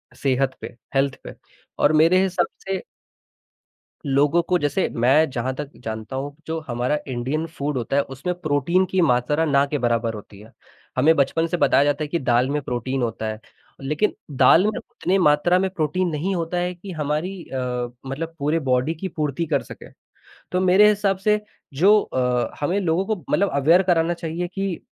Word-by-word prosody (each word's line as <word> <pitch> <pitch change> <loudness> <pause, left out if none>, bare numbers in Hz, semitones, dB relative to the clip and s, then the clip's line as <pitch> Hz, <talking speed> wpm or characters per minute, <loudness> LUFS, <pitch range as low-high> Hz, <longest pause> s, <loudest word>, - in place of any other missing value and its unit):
सेहत 135 -1 0
पे, - - -8 0.2
हेल्थ 135 0 +2
पे - - -8 0.5
और 150 - +4
मेरे 165 +4 +5
हिसाब 190 -1 0 0.2
से 195 -1 -2 1.2
लोगों 145 +4 +3
को 180 +2 +1
जैसे 145 +5 0
मैं 135 +7 +4
जहाँ 130 0 -2
तक 145 0 -5
जानता 110 +2 -5
हूँ 140 +2 -4
जो 160 0 -2
हमारा 125 +4 0
इंडियन 130 +5 -2
फूड 145 -3 -4
होता 125 +2 -2
है 140 - +4
उसमें 135 +7 -4
प्रोटीन 165 +5 +1
की 190 - +2
मात्रा 145 +2 +2
ना 140 -2 +3
के 150 - +1
बराबर 115 -3 0
होती 105 -1 -11
है, 110 +2 -15 0.5
हमें 155 +5 +5
बचपन 160 +4 +1
से 175 - -2
बताया 140 - +4
जाता 145 +1 0
है - - -3
कि 170 +3 -1
दाल 125 0 +2
में 150 0 -1
प्रोटीन 130 +1 -3
होता 115 -2 -2
है, 110 0 -4 0.4
लेकिन 150 +9 0 0.2
दाल 175 - +6
में 215 - +2
उतनी 185 +2 -2
मात्रा 175 +1 +3
में 190 0 0
प्रोटीन 180 0 -1
नहीं 180 +6 -2
होता 170 +1 -2
है 180 +1 -1
कि 190 +3 -9
हमारी 160 +4 -3
अ, 125 -2 -3
मतलब 160 +5 -5
पूरे 150 +3 +1
बॉडी 130 +1 +1
की 190 +4 -5
पूर्ति 155 -2 -2
कर - - 0
सके, - - -12 0.6
तो 180 - +1
मेरे 190 +3 +6
हिसाब 205 -2 +1
से 210 +2 +2 0.3
जो 200 +8 +5
अ, 125 -2 -1
हमें 175 +7 0
लोगों 180 0 +1
को 220 - 0
मतलब 200 +1 +2
अवेयर 160 +6 +4
कराना 175 -2 +2
चाहिए 170 +1 -4
कि 195 -3 -2
150 Hz, 185 wpm, -22 LUFS, 130-180 Hz, 1.2 s, दाल